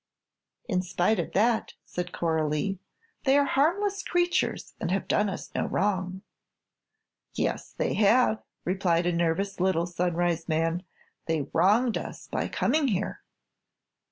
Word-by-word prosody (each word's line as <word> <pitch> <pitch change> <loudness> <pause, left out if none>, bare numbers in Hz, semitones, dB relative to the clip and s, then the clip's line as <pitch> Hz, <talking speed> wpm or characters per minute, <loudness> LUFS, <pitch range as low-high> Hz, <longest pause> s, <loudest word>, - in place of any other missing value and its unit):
"In 185 -6 +1
spite 180 +3 +1
of 170 - -3
that," 225 +3 +2
said 180 0 -4
Coralie, 160 +3 0 0.5
"they 270 +1 +5
are 285 - +4
harmless 385 +9 +1
creatures 350 -1 0
and - - -2
have 190 +1 -1
done 210 0 +2
us 190 - -7
no - - -1
wrong." 190 -1 -1 1.1
"Yes, - - -2
they - - 0
have," 220 +1 +4 0.2
replied 175 -2 +1
a 175 - +1
nervous 170 +4 0
little 180 -2 +2
Sunrise 175 -1 -1
man; 165 +2 +1 0.5
"they 160 -2 +1
wronged 220 +5 +3
us - - -8
by - - -2
coming 295 +2 +1
here." 205 -3 -2
190 Hz, 130 wpm, -27 LUFS, 175-230 Hz, 1.1 s, they